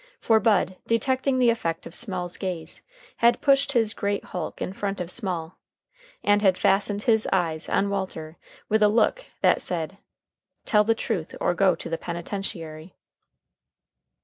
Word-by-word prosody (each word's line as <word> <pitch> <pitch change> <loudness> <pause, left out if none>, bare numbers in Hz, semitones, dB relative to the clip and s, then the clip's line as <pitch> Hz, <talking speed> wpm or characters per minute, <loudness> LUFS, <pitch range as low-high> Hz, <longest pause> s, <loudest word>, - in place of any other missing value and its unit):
For 225 -1 +4
Bud, 200 -4 +2
detecting 260 +3 +1
the 245 -2 +5
effect 165 -7 -3
of - - -9
Small's 180 -4 -4
gaze, 180 -4 -5 0.4
had 235 0 +4
pushed 280 0 +3
his 225 -3 +2
great 200 0 -2
hulk 180 -3 -5
in 185 - -3
front 200 0 -3
of 180 0 -4
Small, 180 -7 -4 0.6
and 205 0 +4
had 190 -3 +4
fastened 200 +1 +1
his 220 -2 +3
eyes 165 -4 0
on 200 - +2
Walter 170 -5 -4 0.3
with 220 +1 +2
a 210 - +7
look 235 - +2 0.2
that - - +4
said, 175 +2 -3 0.7
"Tell 210 -1 +4
the 225 +1 +2
truth 195 -8 -3
or - - +1
go 190 +1 +3
to 165 - -4
penitentiary." 170 -2 -6
195 Hz, 150 wpm, -25 LUFS, 175-225 Hz, 0.7 s, a